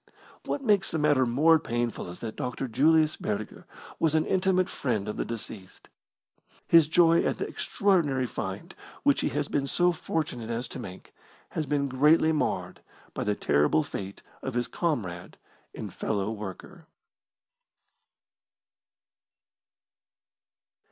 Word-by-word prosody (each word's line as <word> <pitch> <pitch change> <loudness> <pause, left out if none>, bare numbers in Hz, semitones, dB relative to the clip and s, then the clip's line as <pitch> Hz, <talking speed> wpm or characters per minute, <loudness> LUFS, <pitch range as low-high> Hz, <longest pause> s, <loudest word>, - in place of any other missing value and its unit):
What 275 - -2
makes 205 -5 +3
the - - -2
matter 145 -4 +3
more 155 +7 +5
painful 120 - -3
is 90 - -10
that 110 -2 -5
Dr. 125 +1 -3
Julius 155 +5 +3
Burger 105 0 -4 0.3
was 160 -1 +2
an 155 - +2
intimate 185 -1 +2
friend 110 -6 -2
of 105 - -3
the - - -1
deceased. 110 -4 -8 0.8
His 165 -3 +6
joy 165 +1 +5
at - - 0
the - - -3
extraordinary 160 -10 +1
find 95 -4 -5 0.3
which - - +3
he - - 0
has - - -2
been 140 -1 -1
so 175 +5 +3
fortunate 150 -8 -3
as 120 +1 -2
to - - -7
make 95 0 -10 0.4
has 155 -2 -3
been 140 -1 0
greatly 150 +5 +4
marred 155 - -2 0.3
by - - -3
the 105 -1 0
terrible 75 - +2
fate 100 -8 -7 0.2
of 130 -2 -5
his 120 0 0
comrade 100 - -3 0.4
and - - -6
fellow 105 -1 -2
worker. 110 - -8
135 Hz, 135 wpm, -27 LUFS, 110-160 Hz, 0.8 s, His